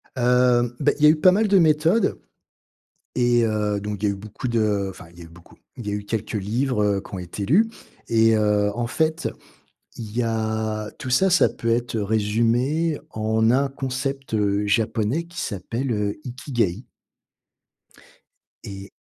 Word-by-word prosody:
Heu, 125 Hz, -1 st, +3 dB
beh, 145 Hz, -, +2 dB
il 150 Hz, -, -1 dB
y -, -, +9 dB
a -, -, +8 dB
eu 155 Hz, 0 st, +3 dB
pas 185 Hz, -, +6 dB
mal 210 Hz, +4 st, +2 dB
de 200 Hz, -1 st, +4 dB
méthodes 165 Hz, +6 st, +2 dB, 1.0 s
et 120 Hz, -1 st, +3 dB
heu, 105 Hz, -2 st, 0 dB
donc 105 Hz, -1 st, -5 dB
il -, -, +2 dB
y 100 Hz, -, +1 dB
a -, -, -4 dB
eu -, -, -9 dB
beaucoup 105 Hz, +5 st, -6 dB
de, 105 Hz, -4 st, 0 dB
enfin, 90 Hz, -1 st, -12 dB
il 85 Hz, -, -19 dB
y -, -, -10 dB
a -, -, -9 dB
eu -, -, -13 dB
beaucoup 85 Hz, +1 st, -18 dB, 0.2 s
il 115 Hz, -, -8 dB
y -, -, -1 dB
a -, -, -2 dB
eu 105 Hz, 0 st, -4 dB
quelques 110 Hz, +1 st, -4 dB
livres, 110 Hz, +4 st, -1 dB
heu, 100 Hz, -1 st, +1 dB
qui -, -, -11 dB
ont 95 Hz, -, -4 dB
été 90 Hz, +3 st, -6 dB
lus 210 Hz, -, +4 dB, 0.4 s
et 115 Hz, -1 st, +4 dB
heu, 105 Hz, -1 st, +2 dB
en 120 Hz, 0 st, -2 dB
fait, 160 Hz, +5 st, 0 dB, 0.7 s
il 110 Hz, -2 st, -8 dB
y 125 Hz, -, +2 dB
a 110 Hz, -1 st, -2 dB
tout 130 Hz, -, -6 dB
ça, 190 Hz, +10 st, +3 dB
ça 180 Hz, -, +5 dB
peut 115 Hz, -, -5 dB
être, 120 Hz, 0 st, 0 dB
heu, 110 Hz, -, 0 dB
résumé 115 Hz, +9 st, +1 dB
en 110 Hz, +1 st, +1 dB
un 135 Hz, +2 st, +2 dB
concept, 135 Hz, -1 st, -4 dB
heu, 105 Hz, -1 st, +1 dB
japonais 115 Hz, +7 st, 0 dB
qui 170 Hz, +1 st, -8 dB
s'appelle, 115 Hz, +6 st, -3 dB
heu, 105 Hz, -1 st, -1 dB
Ikigaï 120 Hz, -, -2 dB, 1.8 s
et 100 Hz, 0 st, -9 dB
115 Hz, 190 wpm, -23 LUFS, 105-130 Hz, 1.8 s, y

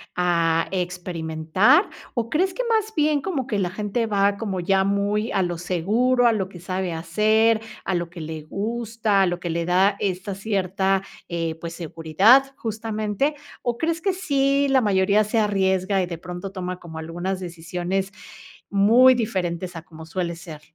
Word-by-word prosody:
a 170 Hz, -2 st, +2 dB
experimentar? 180 Hz, -, +1 dB, 0.3 s
O, 235 Hz, -3 st, -2 dB
¿crees 365 Hz, +6 st, +1 dB
que -, -, -2 dB
más 440 Hz, -1 st, +1 dB
bien 300 Hz, -2 st, +2 dB
como 275 Hz, -9 st, -3 dB
que 215 Hz, -, -1 dB
la 185 Hz, -3 st, 0 dB
gente 210 Hz, +4 st, -2 dB
va 200 Hz, -1 st, +2 dB
como 200 Hz, -4 st, -3 dB
ya 190 Hz, +2 st, +2 dB
muy 200 Hz, +3 st, 0 dB
a 190 Hz, -, +1 dB
lo 175 Hz, -1 st, -2 dB
seguro, 220 Hz, +9 st, +2 dB
a 230 Hz, -, +4 dB
lo 190 Hz, -3 st, -2 dB
que 175 Hz, -, -11 dB
sabe 185 Hz, 0 st, -3 dB
hacer, 215 Hz, +7 st, +2 dB, 0.2 s
a 190 Hz, -, 0 dB
lo 170 Hz, -1 st, -2 dB
que 175 Hz, -, -11 dB
le 160 Hz, 0 st, -6 dB
gusta, 220 Hz, +2 st, -1 dB
a 190 Hz, -, +4 dB
lo 175 Hz, 0 st, -2 dB
que 175 Hz, -, -4 dB
le 170 Hz, +1 st, -1 dB
da 190 Hz, +3 st, +3 dB
esta 190 Hz, 0 st, -2 dB
cierta, 195 Hz, -1 st, 0 dB, 0.3 s
eh, 165 Hz, -2 st, -2 dB
pues, 165 Hz, 0 st, -7 dB
seguridad 175 Hz, -, +3 dB
justamente? 220 Hz, +4 st, -2 dB, 0.3 s
O, 240 Hz, -2 st, -2 dB
¿crees 330 Hz, +1 st, -1 dB
que 390 Hz, +1 st, +1 dB
sí 280 Hz, -5 st, +1 dB
la 265 Hz, -1 st, +4 dB
mayoría 200 Hz, 0 st, +3 dB
se 220 Hz, +2 st, 0 dB
arriesga, 190 Hz, -2 st, +1 dB
y -, -, 0 dB
de 170 Hz, -2 st, -6 dB
pronto 180 Hz, +3 st, -7 dB
toma 180 Hz, -1 st, -5 dB
como 160 Hz, -2 st, -9 dB
algunas 175 Hz, +4 st, -4 dB
decisiones 180 Hz, +2 st, -3 dB, 0.6 s
muy 230 Hz, +6 st, +6 dB
diferentes 185 Hz, -6 st, -2 dB
a 160 Hz, -, -8 dB
como 160 Hz, 0 st, -12 dB
suele 170 Hz, 0 st, -3 dB
ser? 165 Hz, -3 st, -10 dB
195 Hz, 175 wpm, -23 LUFS, 175-225 Hz, 0.6 s, muy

